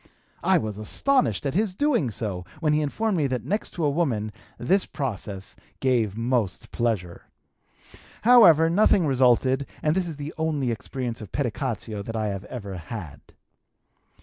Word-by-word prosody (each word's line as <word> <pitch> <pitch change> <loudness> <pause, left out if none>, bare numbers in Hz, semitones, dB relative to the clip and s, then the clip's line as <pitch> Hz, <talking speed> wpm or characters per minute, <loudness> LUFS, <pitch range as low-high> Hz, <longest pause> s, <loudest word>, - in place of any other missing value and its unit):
I - - +4
was 105 -1 -3
astonished 260 - +1
at 140 - 0
his 195 +1 0
doing 250 - +2
so 100 -4 -4 0.2
when 150 -3 +2
he 150 - +2
informed 200 +7 -1
me 150 -3 +2
that 125 -2 -3
next 210 +3 -1
to 170 - -2
a - - +3
woman 125 -10 0 0.3
this 190 +11 +2
process 100 -7 -5 0.2
gave 115 -6 +1
most 115 -4 -1
pleasure. 105 -8 -2 1.0
However, 185 -10 +7
nothing 185 +1 +4
resulted 130 0 +3 0.2
and 150 +1 +2
this 185 -2 0
is 165 - -5
the 145 +1 -6
only 150 -6 0
experience 120 +1 -4
of 105 - -9
pedicatio 115 -5 -3
that 115 +3 -6
I 110 -1 -1
have 100 0 -5
ever 100 -6 -6
had. 85 - -8
130 Hz, 155 wpm, -25 LUFS, 110-160 Hz, 1.0 s, However